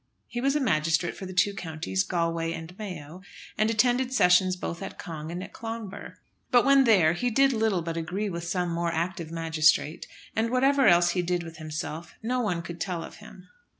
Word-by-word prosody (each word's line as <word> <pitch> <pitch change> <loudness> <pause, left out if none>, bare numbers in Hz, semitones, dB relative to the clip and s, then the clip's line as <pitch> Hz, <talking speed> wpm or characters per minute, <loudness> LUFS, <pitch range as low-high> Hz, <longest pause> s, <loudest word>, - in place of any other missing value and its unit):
He 240 +1 -5
was 275 +2 +2
a - - +3
magistrate 165 - +1
for 190 - -7
the - - -7
two 195 +2 +2
counties, 155 - -3
Galway 165 - -1
and 165 +2 -8
Mayo, 180 -4 -7 0.3
and 215 +1 +2
attended 245 +3 +2
sessions 185 -5 +4
both 170 -1 -5
at 195 - -7
Cong 160 -3 -7
and 180 +2 -5
at - - -11
Clonbur. 225 -4 -7 0.3
But 245 -2 +4
when 275 -1 +6
there 185 -9 +5
he 245 +8 -1
did 270 +3 +3
little 220 -6 +1
but 165 0 -4
agree 180 +6 -2
with 170 -3 -4
some 175 0 -1
more 170 0 -1
active 170 0 -3
magistrate; 160 -1 +1 0.3
and 225 +1 +1
what 255 +1 +1
else 255 -12 +5
he 180 - 0
did 175 0 -1
with 165 -1 -10
himself 155 +1 -6
no 250 +3 0
one 180 -8 -1
could 170 0 -8
tell 175 -3 -2
of - - -10
him. - - -14
180 Hz, 200 wpm, -27 LUFS, 165-220 Hz, 0.3 s, when